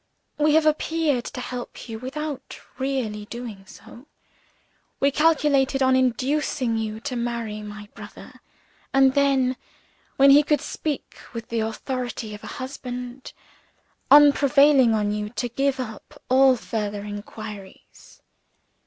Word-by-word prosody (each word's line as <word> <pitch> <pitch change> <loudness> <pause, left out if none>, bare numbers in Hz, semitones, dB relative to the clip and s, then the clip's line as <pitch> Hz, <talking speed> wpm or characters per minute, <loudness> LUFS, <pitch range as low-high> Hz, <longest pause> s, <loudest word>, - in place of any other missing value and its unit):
"We 300 0 +4
have 315 0 +4
appeared 310 -4 +1
to 255 - -6
help 250 0 -7
you, 225 -1 -6
without 280 +2 -6 0.2
really 250 -6 -2
doing 220 -4 -8
so; 255 +5 -14 0.9
we 280 - +3
calculated 280 -3 +2
on 260 0 +4
inducing 260 0 0
you 220 0 -4
to 260 0 -4
marry 235 -3 -3
my 210 0 -9
brother, - - -12 0.5
and 270 -1 +5
then 270 -2 +2 0.6
(when 275 +1 +7
he 285 +2 +8
could 295 -1 +1
speak 295 +1 -5
with 230 -1 -7
the 230 - -1
authority 225 0 -4
of 210 - -10
a - - -8
husband) 250 -1 -7 0.8
on 290 0 +8
prevailing 275 -4 +4
on 210 -1 0
you 210 0 -3
to 245 +2 -3
give 275 +2 0
up 220 -4 -8
all 265 0 +6
further 210 -3 -4
inquiries. 205 -1 -10
255 Hz, 130 wpm, -24 LUFS, 220-280 Hz, 0.9 s, he